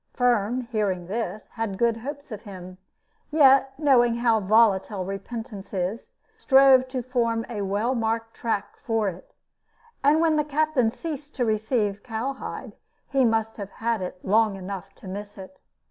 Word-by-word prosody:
Firm, 245 -1 +2
hearing 210 -7 -2
this, 215 +2 -4
had 225 -4 -3
good 235 0 +2
hopes 280 +3 -7
of 215 - -6
him; 185 -3 -10 0.5
yet 270 -3 +5
knowing 250 -6 +4
how 235 -2 +3
volatile 205 -2 +3
repentance 200 +1 -6
is, 190 +5 -3 0.2
he - - -37
strove 265 -1 +6
to 255 -1 -4
form 230 -2 0
a 220 -4 -4
well 205 +6 0
marked 225 -1 -1
track 215 -3 -3
for 225 -3 0
it. 180 0 -12 0.7
And 290 +3 +5
when 320 -2 +3
the 300 - +3
captain 295 -4 +1
ceased 295 +2 -7
to 250 - 0
receive 215 -2 0
cowhide, 250 +3 -5 0.4
he 270 -2 +3
must 225 -1 +1
have 200 -2 -7
had 230 -2 -1
it 180 0 -5
long 215 +1 +3
enough 195 0 -7
to - - -13
miss 205 +2 -7
it. 195 +9 -11
225 Hz, 160 wpm, -25 LUFS, 200-255 Hz, 0.7 s, strove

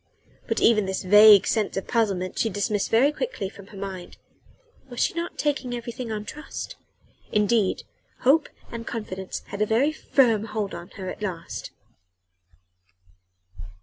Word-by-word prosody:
But 225 - 0
even 215 -4 +4
this 190 0 -2
vague 210 +1 +8
sense 215 -4 0
of 195 - -3
puzzlement 195 -6 0
she 225 - +2
dismissed 205 0 -1
very 255 +6 +4
quickly 300 - -4
from 200 0 -14
her 205 - -12
mind. 190 -2 -7 0.7
Was 245 - -7
she - - +2
not 340 +1 -4
taking 280 -4 -1
everything 235 0 -6
on 210 -1 -4
trust? 305 +7 -7 0.6
Indeed 210 -1 +2 0.4
hope 280 +6 +4 0.2
and 230 -1 -7
confidence 190 -5 -5
had 200 - -5
a 210 - +3
very 245 +8 +3
firm 235 -8 +2
hold 215 -2 -3
on 175 +2 -8
her 190 -1 -6
at - - -8
last. 175 -5 -5
215 Hz, 150 wpm, -25 LUFS, 195-235 Hz, 0.7 s, vague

